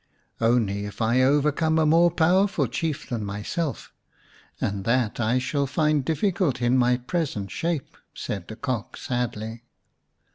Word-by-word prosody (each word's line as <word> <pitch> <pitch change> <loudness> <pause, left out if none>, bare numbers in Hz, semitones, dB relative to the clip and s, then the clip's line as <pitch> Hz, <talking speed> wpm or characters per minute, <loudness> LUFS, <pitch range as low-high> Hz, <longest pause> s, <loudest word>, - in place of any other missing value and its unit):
" - - -28
Only 100 -4 0
if 105 - -8
I 120 +3 +3
overcome 150 +4 +2
a 160 - +3
more 165 +3 +5
powerful 180 +4 +2
Chief 160 -3 -3
than 115 -3 -3
myself, 105 +10 -4 0.7
and 100 -1 -2
that 115 0 +1
I 120 +2 +2
shall 140 +2 0
find 150 +1 +1
difficult 165 - 0
in 120 +1 +2
my 125 -1 +3
present 125 - -3
shape," 165 -5 -3 0.2
said 100 -4 -5
the 110 - -7
Cock 120 -2 -4
sadly. 115 -2 -3
130 Hz, 145 wpm, -25 LUFS, 115-160 Hz, 0.7 s, more